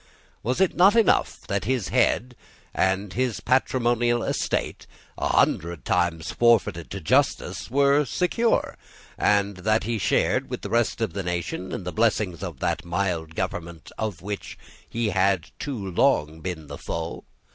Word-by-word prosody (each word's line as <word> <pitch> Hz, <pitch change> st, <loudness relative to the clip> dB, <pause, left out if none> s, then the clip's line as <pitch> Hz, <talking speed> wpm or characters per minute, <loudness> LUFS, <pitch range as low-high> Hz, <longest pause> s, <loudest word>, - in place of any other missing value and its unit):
Was 125 Hz, +8 st, -1 dB
it 190 Hz, -2 st, +2 dB
not 195 Hz, +5 st, +6 dB
enough 230 Hz, -2 st, +3 dB
that 100 Hz, -2 st, -2 dB
his 125 Hz, -5 st, -1 dB
head 125 Hz, +2 st, +1 dB, 0.4 s
and 95 Hz, 0 st, 0 dB
his 125 Hz, -2 st, -1 dB
patrimonial 120 Hz, -2 st, +1 dB
estate, -, -, -2 dB, 0.3 s
a -, -, -1 dB
hundred 85 Hz, -5 st, +1 dB
times 85 Hz, -2 st, 0 dB
forfeited 115 Hz, -8 st, +2 dB
to 100 Hz, -, -5 dB
justice, 80 Hz, -, +1 dB
were 140 Hz, +3 st, +4 dB
secure, 225 Hz, -, 0 dB, 0.4 s
and 100 Hz, -1 st, +2 dB
that 110 Hz, +4 st, +1 dB
he 115 Hz, -1 st, -2 dB
shared, -, -, +1 dB
with -, -, -5 dB
the -, -, -5 dB
rest 120 Hz, 0 st, +1 dB
of 115 Hz, -, -1 dB
the 100 Hz, -, -2 dB
nation, 90 Hz, +1 st, -3 dB
in -, -, -4 dB
the 90 Hz, -, -5 dB
blessings 105 Hz, -6 st, +1 dB
of 85 Hz, -9 st, -6 dB
that 80 Hz, -, -1 dB
mild 85 Hz, -2 st, -2 dB
government 85 Hz, -2 st, -5 dB
of 105 Hz, -6 st, -3 dB
which 105 Hz, 0 st, -5 dB, 0.3 s
he 115 Hz, -1 st, -1 dB
had 95 Hz, -4 st, +1 dB, 0.2 s
long 95 Hz, -, +1 dB
been 80 Hz, -2 st, -5 dB
the -, -, -9 dB
foe? 85 Hz, 0 st, -5 dB
100 Hz, 150 wpm, -25 LUFS, 85-120 Hz, 0.4 s, not